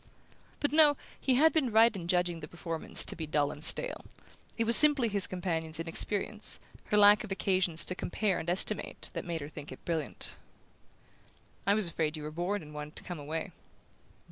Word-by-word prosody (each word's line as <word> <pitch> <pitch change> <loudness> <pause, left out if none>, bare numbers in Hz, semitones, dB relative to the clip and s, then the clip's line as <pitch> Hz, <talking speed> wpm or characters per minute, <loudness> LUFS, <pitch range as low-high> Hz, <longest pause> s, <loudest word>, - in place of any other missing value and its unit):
But 290 - -1
no, 300 -2 +5 0.2
he 260 - +1
had 310 +4 +4
been 275 -7 0
right 225 +1 +4
in 175 -3 -7
judging 175 -1 0
the 150 - -9
performance 165 -1 -2
to - - -4
be 160 -2 -6
dull 145 -1 0
and 150 - -9
stale: - - 0 0.5
it 230 - +1
was 230 +1 +8
simply 290 -6 +8
his 200 -2 +1
companion's 165 -3 -3
inexperience, 205 +5 -1 0.3
her 210 - 0
lack 205 0 +6
of 215 - -9
occasions 185 -4 0
to - - -1
compare 190 +1 -2
and 165 - -5
estimate, 190 +3 -1
that - - -5
made 170 -2 -4
her 145 - -7
think 150 -1 -10
it - - -12
brilliant. 160 -6 -4 1.3
"I 200 - +4
was 215 -2 +1
afraid 160 -2 -2
you 150 - -8
were 150 - -6
bored 175 +4 -3
and 150 0 -13
wanted 150 0 -8
to - - -9
come 175 -3 -7
away." 155 +2 -5
180 Hz, 195 wpm, -30 LUFS, 160-215 Hz, 1.3 s, was